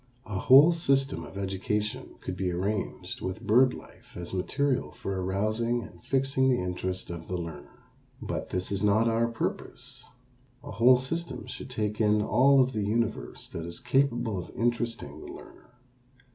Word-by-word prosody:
A 100 Hz, -3 st, -3 dB
whole 140 Hz, -, +8 dB
system 140 Hz, -5 st, +1 dB
of -, -, -10 dB
education 105 Hz, +2 st, -2 dB
could 95 Hz, -, -4 dB
be 90 Hz, 0 st, -1 dB
arranged 95 Hz, +3 st, -3 dB
with 95 Hz, 0 st, -3 dB
bird 125 Hz, +4 st, +5 dB
life -, -, -14 dB
as 85 Hz, +1 st, -7 dB
material 125 Hz, -, 0 dB
for 95 Hz, +5 st, -4 dB
arousing 110 Hz, +5 st, 0 dB
and 85 Hz, -4 st, -13 dB
fixing 135 Hz, 0 st, +2 dB
the 125 Hz, -, +3 dB
interest 90 Hz, -1 st, -3 dB
of 85 Hz, -1 st, -7 dB
the 90 Hz, -, -2 dB
learner. 85 Hz, -2 st, -8 dB, 0.4 s
But -, -, -4 dB
this 90 Hz, +1 st, -2 dB
is 100 Hz, 0 st, -1 dB
not 105 Hz, +2 st, +4 dB
our 115 Hz, +1 st, +2 dB
purpose. 115 Hz, -1 st, -4 dB, 0.6 s
A -, -, -8 dB
whole 125 Hz, +4 st, +6 dB
system 135 Hz, +1 st, -3 dB
should -, -, -8 dB
take 105 Hz, -3 st, -2 dB
in 105 Hz, 0 st, +4 dB
all 130 Hz, +5 st, +5 dB
of 130 Hz, -, -3 dB
the 110 Hz, -, -1 dB
universe 110 Hz, +2 st, -2 dB
that 85 Hz, -, -5 dB
is 85 Hz, 0 st, -7 dB
capable 120 Hz, -7 st, +1 dB
of 90 Hz, -, -7 dB
interesting 115 Hz, -, -1 dB
the -, -, -9 dB
learner. -, -, -13 dB
110 Hz, 165 wpm, -28 LUFS, 95-125 Hz, 0.6 s, whole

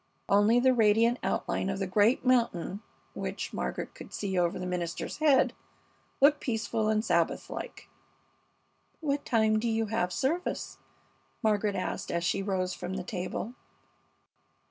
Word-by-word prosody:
Only 205 Hz, +4 st, +5 dB
the 260 Hz, +1 st, +4 dB
radiant 230 Hz, +1 st, +4 dB
outline 190 Hz, -, -1 dB
of 195 Hz, -, -2 dB
the 195 Hz, -, -1 dB
great 210 Hz, +8 st, +3 dB
mountain, 230 Hz, -6 st, +1 dB, 0.3 s
which -, -, -4 dB
Margaret -, -, -3 dB
could -, -, -10 dB
see 195 Hz, -2 st, -2 dB
over 175 Hz, -1 st, +1 dB
the 180 Hz, -, -4 dB
minister's 175 Hz, -2 st, -3 dB
head, 295 Hz, -4 st, +4 dB, 0.7 s
looked 285 Hz, +2 st, +5 dB
peaceful 225 Hz, -2 st, -1 dB
and 215 Hz, +1 st, +1 dB
Sabbath -, -, +1 dB
like. -, -, -7 dB, 1.1 s
"What 285 Hz, -2 st, -1 dB
time 220 Hz, -2 st, +3 dB
do 235 Hz, +1 st, -1 dB
you 225 Hz, 0 st, +1 dB
have 200 Hz, -4 st, -1 dB
service?" 315 Hz, -, -2 dB, 0.6 s
Margaret 210 Hz, -2 st, +2 dB
asked, 185 Hz, -, -3 dB
as 170 Hz, -, -1 dB
she 185 Hz, +3 st, +1 dB
rose 185 Hz, -2 st, -1 dB
from 185 Hz, -, -5 dB
the 190 Hz, -, -3 dB
table. 185 Hz, +4 st, -4 dB
215 Hz, 145 wpm, -29 LUFS, 185-235 Hz, 1.1 s, Only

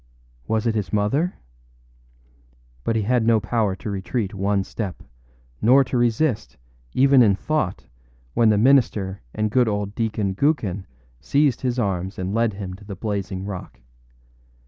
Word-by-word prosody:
Was 110 Hz, 0 st, 0 dB
it 115 Hz, -, +2 dB
his 100 Hz, -6 st, -2 dB
mother? 135 Hz, -, +1 dB, 1.5 s
But 115 Hz, -, 0 dB
he 110 Hz, -, +1 dB
had 120 Hz, +2 st, +2 dB
no 115 Hz, -1 st, +5 dB
power 105 Hz, -2 st, 0 dB
to 105 Hz, -, -7 dB
retreat 100 Hz, +1 st, -2 dB
one 100 Hz, 0 st, 0 dB
step, 95 Hz, -2 st, -6 dB, 0.6 s
nor 130 Hz, +5 st, +6 dB
to 130 Hz, -, -5 dB
resist, 120 Hz, +1 st, 0 dB, 0.4 s
even 135 Hz, 0 st, +5 dB
in 105 Hz, -5 st, +5 dB
thought, 105 Hz, -, -2 dB, 0.5 s
when 115 Hz, -2 st, +4 dB
the 105 Hz, -, +4 dB
minister 105 Hz, -6 st, +3 dB
and 110 Hz, 0 st, 0 dB
good 125 Hz, 0 st, +3 dB
old 105 Hz, -1 st, -2 dB
Deacon 105 Hz, -3 st, -1 dB
Gookin 100 Hz, -, 0 dB, 0.3 s
seized 140 Hz, -, +1 dB
his 125 Hz, -1 st, -1 dB
arms 95 Hz, -4 st, -2 dB
and 95 Hz, +1 st, -3 dB
led 115 Hz, -1 st, +1 dB
him 95 Hz, -2 st, -6 dB
to 105 Hz, -, -15 dB
the 100 Hz, -1 st, -7 dB
blazing 100 Hz, -2 st, -3 dB
rock. 95 Hz, -10 st, -7 dB
105 Hz, 150 wpm, -23 LUFS, 100-120 Hz, 1.5 s, nor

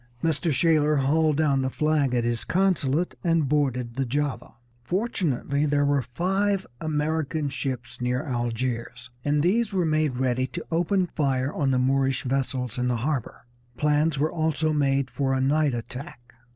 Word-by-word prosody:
Mr. 165 Hz, +1 st, +1 dB
Shaler 150 Hz, +1 st, +3 dB
hauled 150 Hz, +2 st, +2 dB
down 145 Hz, -4 st, +2 dB
the 130 Hz, -, 0 dB
flag 150 Hz, -3 st, +1 dB
at 120 Hz, -, +1 dB
his 120 Hz, -2 st, -1 dB
consulate, 180 Hz, -4 st, +1 dB
and 165 Hz, -4 st, +2 dB
boarded 130 Hz, -5 st, 0 dB
the 135 Hz, -, +1 dB
Java. 140 Hz, +2 st, -3 dB, 0.3 s
Fortunately 155 Hz, -, -1 dB
there 145 Hz, 0 st, +2 dB
were 140 Hz, -1 st, +2 dB
five 190 Hz, +9 st, 0 dB
American 155 Hz, -1 st, -1 dB
ships 130 Hz, -3 st, -5 dB
near 125 Hz, +3 st, 0 dB
Algiers; 120 Hz, -1 st, -3 dB
and 145 Hz, 0 st, +1 dB
these 215 Hz, +5 st, +2 dB
were 185 Hz, -3 st, +1 dB
made 155 Hz, -4 st, +1 dB
ready 130 Hz, 0 st, 0 dB
to 170 Hz, +5 st, -7 dB
open 175 Hz, +3 st, +2 dB
fire 140 Hz, -4 st, -1 dB
on 140 Hz, -3 st, 0 dB
the 130 Hz, -, +2 dB
Moorish 135 Hz, 0 st, +1 dB
vessels 130 Hz, -2 st, -2 dB
in 125 Hz, -, 0 dB
the 125 Hz, -1 st, +1 dB
harbor. 140 Hz, -6 st, -3 dB, 0.3 s
Plans 150 Hz, +1 st, +2 dB
were 155 Hz, +3 st, +1 dB
also 160 Hz, -1 st, 0 dB
made 135 Hz, -3 st, +1 dB
for 135 Hz, +1 st, 0 dB
a -, -, 0 dB
night 140 Hz, 0 st, +2 dB
attack. 120 Hz, +2 st, -8 dB
145 Hz, 160 wpm, -25 LUFS, 130-155 Hz, 0.3 s, Shaler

